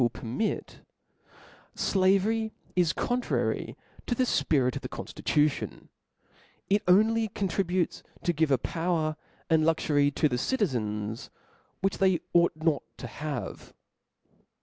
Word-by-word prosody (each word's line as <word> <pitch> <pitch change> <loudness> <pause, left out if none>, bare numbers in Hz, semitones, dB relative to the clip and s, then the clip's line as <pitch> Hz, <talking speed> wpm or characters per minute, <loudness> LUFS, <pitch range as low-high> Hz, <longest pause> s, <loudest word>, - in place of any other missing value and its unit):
wiU 120 - +4
permit^ 125 - -3 1.0
fl^^very 200 +4 +2 0.2
is 175 -3 +3
contrary 245 +7 -1 0.3
to 240 - 0
the 255 - +2
fpirit 135 - +2
of - - -4
the - - -6
conftittition: 150 -1 -1 0.8
it 205 +1 +4
only 220 +4 +4
contributes 185 -3 -1 0.2
to 175 - +1
giVe 160 -1 +1
a 135 - +4
power 165 +2 -1 0.3
and 160 -1 +3
kxury 150 -3 +2
to 155 - +3
the 125 -4 -1
citizens 110 - -1 0.5
which 195 +1 0
they 190 -3 +3
ought 170 -2 +4
not 155 -2 +1 0.2
to - - -7
have. 145 +2 -6
165 Hz, 120 wpm, -28 LUFS, 145-195 Hz, 1.0 s, wiU